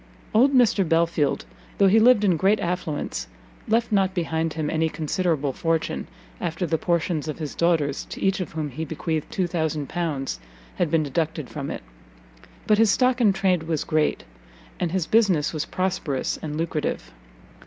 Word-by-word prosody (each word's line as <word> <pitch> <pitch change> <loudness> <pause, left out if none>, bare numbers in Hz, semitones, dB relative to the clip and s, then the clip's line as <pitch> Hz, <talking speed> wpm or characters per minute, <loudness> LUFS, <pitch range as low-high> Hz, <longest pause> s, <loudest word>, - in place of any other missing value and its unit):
Old 250 +6 +5
Mr 245 -6 +4
Belfield, 165 -3 +1 0.3
though 200 - +5
he 210 +4 +5
lived 230 -1 +6
in 185 -4 +4
great 195 +6 +3
affluence, 170 -4 -3 0.4
left 230 +1 +1
not 190 -2 +2
behind 165 -2 -1
him 155 -1 -2
any 160 +1 +1
considerable 155 -2 -1
fortune, 165 +1 -1 0.3
after 170 +1 -2
the 160 -1 0
portions 170 -3 0
of 155 - -4
his 155 -3 -5
daughters, 160 -5 +1
to - - -8
each 195 0 +1
of 185 - -5
whom 155 -2 -3
he 160 +6 -4
bequeathed 160 0 -3
L2000, 160 -4 -2 0.4
had 175 - +1
been 160 0 +2
deducted 155 0 -2
from 140 -2 -5
it. - - -5 0.8
But 215 0 +3
his 225 -1 +5
stock 255 +3 +3
in 215 -4 +6
trade 190 -3 +1
was 160 -2 -2
great, 155 -1 0 0.6
and 175 - -1
his 185 -2 0
business 190 -8 +2
was 155 - -2
prosperous 180 -7 -2
and 150 -1 -4
lucrative. 160 - -2
165 Hz, 165 wpm, -24 LUFS, 155-190 Hz, 0.8 s, lived